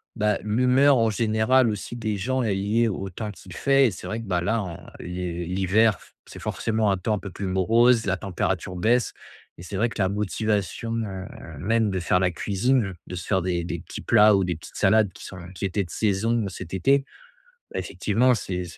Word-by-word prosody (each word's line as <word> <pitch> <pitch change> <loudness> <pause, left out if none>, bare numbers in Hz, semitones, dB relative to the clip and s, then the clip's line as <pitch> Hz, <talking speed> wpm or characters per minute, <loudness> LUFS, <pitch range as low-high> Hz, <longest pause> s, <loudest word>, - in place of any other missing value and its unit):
bah, 105 -2 +1
l'humeur 125 +5 +4
en 115 -1 +3
général 110 +3 +3
aussi 105 +3 -5
des 110 -3 -2
gens 130 +6 -1
est 105 -3 +1
liée 110 +4 +1
au 95 -2 -3
temps 105 +3 -5
qu'il 95 -2 -13
fait 135 +2 +4
et - - -1
c'est 90 - -8
vrai 110 +1 -3
que, - - -8
bah, 90 -2 0
là, 110 +4 0
en 85 -3 -6 0.2
l'hi 90 -1 -4
l'hiver, 95 +4 +2
f - - -20
c'est - - -10
forcément 110 -2 0
un 95 - +1
temps 105 +4 -1
un - - -4
peu 100 - -7
plus 100 - -5
morose. 115 +5 +3
La 95 0 +1
température 95 -1 -2
baisse 115 +6 +2 0.4
et 85 - -10
c'est 95 +2 -5
vrai 115 +3 +2
que 100 - -4
la 95 - +2
motivation, 105 +2 -1
heu, 95 -4 -4 0.3
même 110 +4 +1
de 95 - -1
faire 90 +1 +2
la 90 -1 +2
cuisine, 105 +3 0
de 90 - -6
se 90 - -6
faire 95 -2 +2
des 85 -1 -1
des 85 0 -4
petits - - -8
plats 105 -1 +5
ou 95 - +2
des 90 -2 -1
petites 80 - -13
salades 105 -1 +3
qui - - -12
sont 90 - -9 0.2
qui 100 - -4
étaient 100 +1 0
de 85 - -15
saison 110 +1 0
cet 90 -1 -8
été, 135 +9 +2 0.7
beh, - - -2
effectivement 120 +5 +1
c'est 90 -4 -3
c'est 85 - -9
105 Hz, 220 wpm, -25 LUFS, 95-115 Hz, 0.7 s, plats